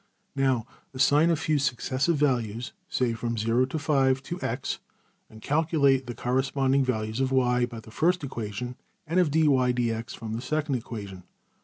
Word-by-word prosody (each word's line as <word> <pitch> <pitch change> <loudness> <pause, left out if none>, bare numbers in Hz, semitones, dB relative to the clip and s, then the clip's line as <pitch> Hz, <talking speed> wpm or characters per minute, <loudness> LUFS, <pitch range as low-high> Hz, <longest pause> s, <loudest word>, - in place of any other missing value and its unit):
\] - - -45
Now 130 -4 +1 0.3
assign 145 +5 +4
a 170 - +4
few 155 -1 0
successive 135 +3 0
values, 120 -5 0 0.2
say 125 -2 +1
from 115 +1 -3
$0$~to~$5$, 130 +4 +2
to~$x$; 140 -7 -3 0.5
and 110 0 -14
calculate 140 -4 +2
the 120 - -5
corresponding 135 +2 +1
values 110 -3 -2
of~$y$ 130 -2 +2
by 115 -2 -8
the 110 0 -14
first 175 +7 +1
equation; 120 -1 -5 0.3
and 170 +4 +1
of~$\dfrac{dy}{dx}$ 125 -8 +2
from 110 -1 -6
the 115 - -3
second 150 +2 -1
equation. 105 -6 -5
130 Hz, 140 wpm, -27 LUFS, 115-145 Hz, 0.5 s, assign